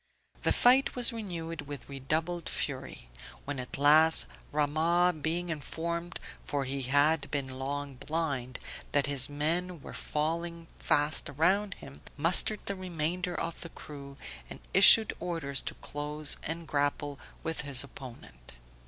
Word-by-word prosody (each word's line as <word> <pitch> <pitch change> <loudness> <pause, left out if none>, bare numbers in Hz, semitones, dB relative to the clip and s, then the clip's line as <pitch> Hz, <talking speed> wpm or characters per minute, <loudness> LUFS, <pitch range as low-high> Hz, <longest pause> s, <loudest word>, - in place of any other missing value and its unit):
The - - +1
fight 255 +3 +4
was 245 -1 +3
renewed 170 -8 -6
with 145 -1 -7
redoubled 155 +5 -3
fury; - - -4 0.4
when 145 -1 -4
at 125 - -4
last, 155 +3 +6 0.3
Rahmah, 160 +3 +1
being 170 +3 -1
informed 170 +3 -4 0.2
(for 140 -1 -2
he 135 +1 -3
had 145 +4 +2
been 130 -3 -4
long 140 0 -4
blind) 140 -5 -3 0.4
that 145 -1 +3
his 140 -2 +5
men 165 +4 -1
were - - -9
falling 165 +2 -3
fast 145 +1 +2
around 190 +8 +1
him, 135 - -11 0.2
mustered 175 +7 +3
the 200 - -2
remainder 180 -1 -3
of 165 - -4
the 170 - -8
crew, 140 -3 -11 0.3
and - - -9
issued 200 +3 +9
orders 160 -6 -2
to - - -6
close 150 0 -3
and 165 +1 -5
grapple 145 -1 -1 0.2
with 160 0 -2
his 140 -3 +1
opponent. 120 - -12
155 Hz, 135 wpm, -30 LUFS, 140-170 Hz, 0.4 s, issued